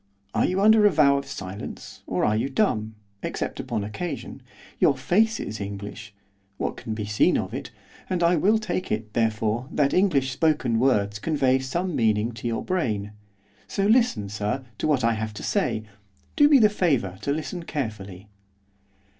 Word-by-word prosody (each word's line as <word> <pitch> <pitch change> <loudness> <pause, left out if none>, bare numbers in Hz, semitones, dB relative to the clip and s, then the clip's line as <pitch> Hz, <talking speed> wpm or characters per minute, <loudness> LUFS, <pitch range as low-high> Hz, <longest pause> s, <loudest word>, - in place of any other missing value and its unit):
Are - - +2
you 185 +1 0
under 215 0 +6
a - - +6
vow 140 -6 +4
of 140 - -9
silence, 100 -5 -8
or - - 0
are 105 - +2
you 120 +5 0
dumb, 110 - 0 0.3
except - - -4
upon 105 - -2
occasion? 140 - -5 0.4
Your - - +4
face 220 +4 +2
is 110 0 -5
English, 100 +1 -7 0.5
what - - -2
can 110 - -5
be 105 -1 -4
seen 105 +1 +3
of - - -3
it, - - -5 0.4
and 180 -2 0
I 170 +1 +4
will 200 +7 +3
take 215 -4 -3
it, 105 0 -3
therefore, 110 +1 0
that 145 -3 +1
English 145 -9 +2
spoken 130 -5 +1
words 105 -5 +2
convey 135 -2 +2
some 170 +7 -2
meaning 110 -2 +2
to 115 0 -6
your 115 -1 -2
brain. 110 - -1 0.6
So 195 - -1
listen, 215 - +3
sir, 105 +6 -3
to - - 0
what 140 -5 +2
I 115 0 +3
have 110 -1 -4
to - - -7
say, 110 - 0 0.5
do 290 -1 +6
me 290 - +7
the 220 -4 +6
favour 135 - 0
to 140 - -1
listen 160 +4 -3
carefully. 105 - -5
130 Hz, 175 wpm, -25 LUFS, 105-175 Hz, 0.6 s, me